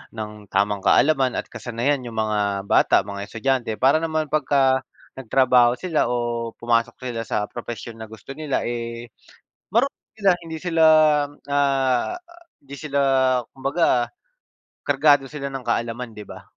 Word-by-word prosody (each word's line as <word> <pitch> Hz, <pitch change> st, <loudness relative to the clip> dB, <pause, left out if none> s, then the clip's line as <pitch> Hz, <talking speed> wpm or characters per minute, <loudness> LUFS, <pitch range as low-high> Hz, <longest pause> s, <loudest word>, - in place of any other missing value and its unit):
ng 105 Hz, -1 st, -7 dB
tamang 100 Hz, +1 st, +1 dB
kaalaman 135 Hz, -4 st, +3 dB
at -, -, -4 dB
kasanayan 125 Hz, +3 st, -2 dB
yung 115 Hz, -, -8 dB
mga 105 Hz, -2 st, 0 dB
bata, 100 Hz, -, +4 dB
mga 100 Hz, 0 st, -6 dB
estudyante, 125 Hz, +1 st, -1 dB
para 135 Hz, +7 st, +3 dB
naman 155 Hz, -2 st, -2 dB
pagka 135 Hz, -3 st, +2 dB, 0.3 s
nagtrabaho 125 Hz, -1 st, +3 dB
sila 165 Hz, +1 st, 0 dB
o 120 Hz, -1 st, -2 dB
pumasok 115 Hz, 0 st, 0 dB
sila 120 Hz, -3 st, -3 dB
sa -, -, -1 dB
propesyon 115 Hz, -1 st, -7 dB
na 110 Hz, -, -7 dB
gusto 110 Hz, +5 st, -11 dB
nila, 150 Hz, -1 st, -2 dB
eh, 115 Hz, -1 st, -5 dB, 0.6 s
marunong 255 Hz, +5 st, +2 dB, 0.2 s
sila, 195 Hz, -2 st, +4 dB
hindi 160 Hz, -1 st, -6 dB
sila, 165 Hz, -3 st, +1 dB, 0.7 s
ah, 135 Hz, -3 st, +1 dB, 0.5 s
hindi 140 Hz, 0 st, -10 dB
sila 140 Hz, -1 st, -2 dB, 0.5 s
kumbaga, 135 Hz, -2 st, 0 dB, 0.7 s
kargado 145 Hz, -1 st, +3 dB
sila 145 Hz, -2 st, -5 dB
ng 135 Hz, -1 st, -5 dB
kaalaman, 115 Hz, 0 st, -2 dB
'di 105 Hz, -1 st, -11 dB
ba? -, -, -11 dB
125 Hz, 140 wpm, -22 LUFS, 115-140 Hz, 0.7 s, bata